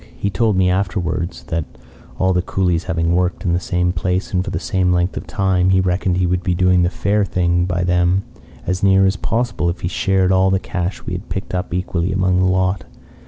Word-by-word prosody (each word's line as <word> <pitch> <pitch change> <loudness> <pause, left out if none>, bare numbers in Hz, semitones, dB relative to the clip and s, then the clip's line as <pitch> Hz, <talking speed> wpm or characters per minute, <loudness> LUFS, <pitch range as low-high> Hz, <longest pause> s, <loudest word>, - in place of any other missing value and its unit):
He 100 - -2
told 105 +2 +1
me 95 -1 +3
afterwards 90 -7 -2
that, 80 0 -1 0.5
all 95 0 +2
the 90 - +2
coolies 90 -2 0
having 85 +1 0
worked 90 +2 0
in 85 - +1
the 85 - +1
same 90 -1 0
place 90 +2 -2
and 90 0 +1
for - - -5
the 90 - -3
same 90 0 0
length 90 +1 +1
of - - -6
time, 95 -2 +1
he 95 0 +4
reckoned 90 0 0
he 90 - +1
would 90 0 0
be 90 -1 0
doing 90 0 +3
the 85 - +2
fair 100 +4 0
thing 85 -2 +1
by 90 0 -1
them 90 +2 +2 0.4
as 90 0 -1
near 95 0 +4
as 95 0 +2
possible 115 -3 -1
if 85 - -4
he - - -1
shared 95 0 +1
all 95 0 +4
the 95 - +2
cash 90 0 -4
we - - -4
had 90 +4 -6
picked 95 - -5
up 90 0 -3
equally 90 0 -1
among 95 -1 +1
the 95 - +3
lot. 95 -1 +1
90 Hz, 225 wpm, -19 LUFS, 90-95 Hz, 0.5 s, he